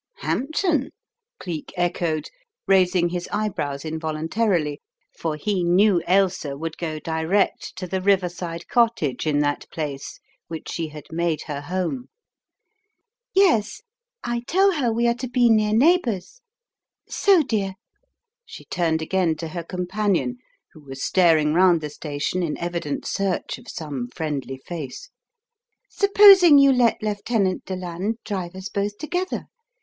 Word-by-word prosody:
"Hampton? 305 0 0 0.3
" 475 +1 -63
Cleek 165 -5 -6
echoed, 170 -3 -1 0.3
raising 180 -2 +3
his 175 0 -4
eyebrows 165 -9 -2
involuntarily, 160 +1 -1 0.3
for 160 -2 -3
he 185 +4 -1
knew 180 +1 +4
Ailsa 185 -6 +1
would 160 +1 -5
go 160 -2 -3
direct 160 +5 -1
to 185 0 -5
the 185 +1 -3
riverside 180 -3 0
cottage 225 - +1
in 145 -1 +2
that 145 0 -1
place 145 -4 -5 0.3
which 160 -2 -7
she 165 -2 -3
had 150 -1 -10
made 165 -2 -1
her 145 -2 -5
home. 185 - -3 1.3
"Yes, 335 - +3 0.4
I 240 0 -1
tell 390 +2 +4
her 275 -9 0
we 235 +1 +1
are 235 - +3
to 245 +1 -6
be 245 -2 +4
near 215 -1 +3
neighbors. 260 - +2 0.7
So, 385 -5 +4
dear," 200 -7 -2 0.7
she - - -12
turned 160 -2 0
again 175 -1 +1
to 165 0 -6
her 170 +1 -5
companion, 195 +6 -1 0.4
who 155 - -15
was 135 -1 -7
staring 160 -5 +3
round 175 0 +5
the 150 -1 -6
station 150 +4 -3
in 165 -4 -2
evident 170 -4 -3
search 195 -2 -2
of 240 - -17
some 140 -7 -5
friendly 140 -4 -3
face, 170 - -7 0.8
"supposing 395 -6 +7
you 275 -1 +6
let 240 -4 +2
Lieutenant 205 -2 -1
Deland 185 +3 -3
drive 185 -4 -4
us 190 +1 -6
both 205 -1 -3
together? 355 - -3
185 Hz, 135 wpm, -23 LUFS, 160-225 Hz, 1.3 s, supposing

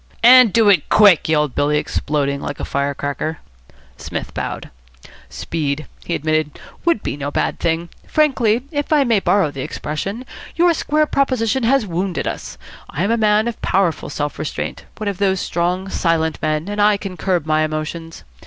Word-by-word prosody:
"And 250 -2 +8
do 225 0 +4
it 190 -7 +4
quick," 200 -7 +5
yelled 150 -4 +2
Billy, 145 +1 +1
exploding 140 -2 -1
like 145 - -5
a - - -3
fire 140 0 -1
cracker. 145 +3 -3 0.6
Psmith - - -6
bowed. - - -5 0.6
"Speed," 155 -2 -3 0.2
he 170 - -2
admitted, 155 -1 -1 0.3
"would 335 -11 +2
be - - -3
no 145 0 -4
bad - - -1
thing. 165 0 -1 0.2
Frankly 255 -6 +2
if 290 -1 -3
I 300 -2 +5
may 230 -5 +2
borrow 195 -5 +2
the 135 - -6
expression 195 - -4 0.3
your 345 0 +4
square 305 -1 +1
proposition 260 -4 0
has 250 +1 +2
wounded 180 0 -2
us. - - -5 0.3
I 160 - -2
am 200 - +1
a - - +3
man 215 0 +2
of 235 - -5
powerful 185 -4 0
self 145 0 -4
restraint, 155 - -4
one 215 - -4
of 200 -3 -3
those 190 -2 +1
strong, 180 +3 -1
silent 165 -4 0
men, 155 +2 -1
and 205 0 -2
I 205 0 +4
can 195 -2 -7
curb 175 -2 -1
my 155 0 +2
emotions. 155 +2 -5
180 Hz, 175 wpm, -19 LUFS, 155-220 Hz, 0.6 s, And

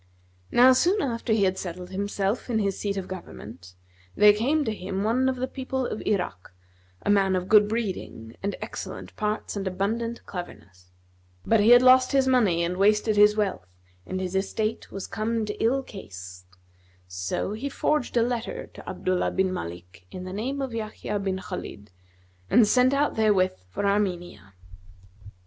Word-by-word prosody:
Now 255 +2 +7
soon 360 +10 +2
after 235 - -2
he 215 -2 +3
had 190 0 +1
settled 180 0 -7
himself 200 +4 -2
in 230 - +1
his 200 -3 0
seat 200 -1 -2
of 190 -1 -4
government, 105 - -10 0.4
there 210 0 +7
came 280 +8 +1
to 220 - -1
him 195 -1 -4
one 250 +5 +2
of 260 - -1
the 255 +1 -3
people 260 0 -3
of 220 - -4
Irak, 180 - -2 0.5
a - - +2
man 195 -2 +3
of 180 0 -2
good 210 0 +6
breeding 115 - -4
and 200 +1 -2
excellent - - -7
parts 210 0 -2
and 200 -1 -3
abundant 225 +5 -2
cleverness; 95 - -9 0.6
but 225 - +3
he 210 +2 +4
had 245 +1 +8
lost 255 0 +6
his 270 -1 +3
money 210 -10 +3
and 175 +2 -2
wasted 210 +2 +3
his 210 0 +6
wealth 195 - -1 0.4
and 185 - -3
his 185 -1 -3
estate 215 +3 -2
was 195 - -5
come 220 +1 -2
to 210 +1 -4
ill 265 +4 +2
case; 95 - -10 0.6
so 90 - -3
he 250 +7 -4
forged 280 -3 0
a 230 - +5
letter 235 -1 -3
to - - -10
Abdullah 185 -1 -1
bin 190 -1 0
Malik 90 - -8
in 185 - -8
the 185 0 -7
name 265 +7 -3
of 260 -3 -5
Yahya 215 -2 -4
bin 190 -1 -2
Khбlid 105 - -7 0.6
and 225 -1 +5
set 250 +4 +4
out 290 +1 +1
therewith 205 -4 +2 0.2
for 200 - -3
Armenia. 175 - -2
205 Hz, 170 wpm, -26 LUFS, 185-235 Hz, 0.6 s, had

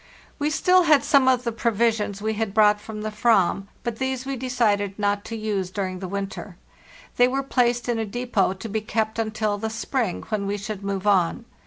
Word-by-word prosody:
oht - - -24
5 - - -31
We 295 +1 +1
still 365 +4 +4
had 300 -4 +5
some 280 -3 +4
of 255 -1 +3
the 235 - -1
provisions 220 -3 0
we 220 0 0
had 215 -2 -3
brou 210 -1 +6
from 215 0 -7
the 215 - -3
/ram, 210 -3 +2 0.2
but 235 -1 -3
these 265 -1 -2
we 275 0 -3
decided 220 -6 0
not 205 -1 0
to 225 - -5
use 205 -4 -2
during 185 -1 -3
the 190 - -5
winter. 195 -1 -5 0.6
They 245 - +6
were 270 +2 -1
placed 245 -3 +1
in 235 -2 0
a - - 0
depot 230 -4 0
to 190 +4 -8
be 220 +1 -2
kept 220 +1 -2
until 215 -2 -1
the 220 +1 -2
spring, 225 -2 -2
when 210 -2 -1
we 205 +1 -1
should 205 -1 -6
move 200 0 -3
on. 195 +2 +2
220 Hz, 215 wpm, -24 LUFS, 200-240 Hz, 0.6 s, brou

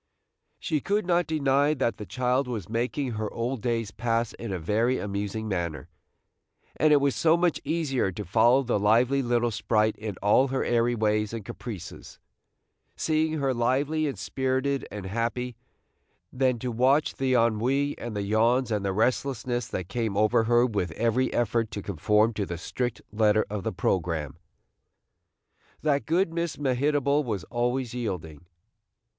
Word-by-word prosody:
She 150 -2 -1
could 205 +5 0
not 175 -1 +2
deny 145 -1 +2
that 125 -4 -1
the 105 - -8
child 125 +2 0
was 115 -7 -4
making 125 +4 -2
her 110 -1 -3
old 120 +1 -3
days 115 -3 -1
pass 115 +1 -1
in 115 -3 -6
a 95 - -1
very 110 +9 +1
amusing 105 +2 -3
manner, 85 -6 -3 0.9
and 155 - +3
it 145 - +6
was 140 -1 +1
so 165 0 +4
much 175 -2 +1
easier 140 -9 0
to 105 - -6
follow 120 +8 +4
the 120 -4 0
lively 120 +7 +3
little 120 -1 +1
sprite 110 0 +1
in 105 -2 -5
all 115 +6 +4
her 135 0 -1
airy 120 0 +2
ways 105 -1 0
and 110 -3 -5
caprices, 100 -7 -8 0.8
seeing 155 0 0
her 140 -4 0
lively 140 +6 +1
and 135 -7 -4
spirited 130 +8 -1
and 105 -2 -6
happy, 115 +4 -2 0.8
than 130 -1 +1
to 125 +2 -4
watch 130 +6 +2
the 130 -1 +1
ennui 125 +5 +1
and 120 -2 -6
the 100 - -1
yawns 115 +4 +2
and 105 -2 0
the 95 -1 -1
restlessness 120 +2 0
that 90 - -4
came 110 -1 -2
over 110 +1 +3
her 120 +1 +4
with 105 -7 -1
every 115 +6 +1
effort 115 -1 0
to 100 - -6
conform 105 +5 +2
to 105 - -2
the 85 - -4
strict 120 +7 -3
letter 110 0 +3
of 105 -2 -3
the - - -2
programme, 80 -6 -1 1.5
that 145 -2 +1
good 170 +1 +1
Miss 170 -1 -2
Mehitable 145 +1 +1
was 105 - -3
always 120 0 -1
yielding. 90 -10 -5
120 Hz, 160 wpm, -27 LUFS, 105-135 Hz, 1.5 s, it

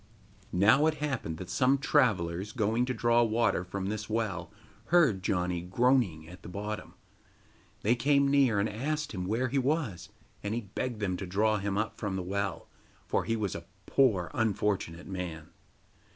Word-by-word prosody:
Now 110 - +5
it 160 - +1
happened 135 - -3
that 90 - -7
some 135 +2 +3
travellers, 105 - +1
going 115 0 +1
to 130 - -2
draw 120 +1 +3
water 115 -4 +2
from 95 +1 -5
this 105 +2 -3
well, 105 -6 -2 0.4
heard 155 - +4
Janni 90 -2 0
groaning 95 -4 +1
at 90 +2 -12
the - - -9
bottom. 105 +3 -5 0.9
They 110 - +4
came 140 +3 +3
near, 135 -7 +4
and 100 - +2
asked 150 +8 -2
him 90 -3 -4
where 120 +5 0
he 140 +2 +1
was, 125 - -1 0.3
and 105 +2 -2
he 120 - -1
begged 110 +2 -4
them 95 -3 -1
to 95 - -5
draw 105 +3 +2
him 100 0 -2
up 110 +1 -2
from 100 -3 -2
the 95 - -2
well, 100 -2 -3 0.4
for - - 0
he 115 - 0
was 105 -4 -2
a 85 - -7 0.2
poor 105 -11 +2
unfortunate 100 -6 -1
man. 85 -5 -6
105 Hz, 170 wpm, -30 LUFS, 90-125 Hz, 0.9 s, Now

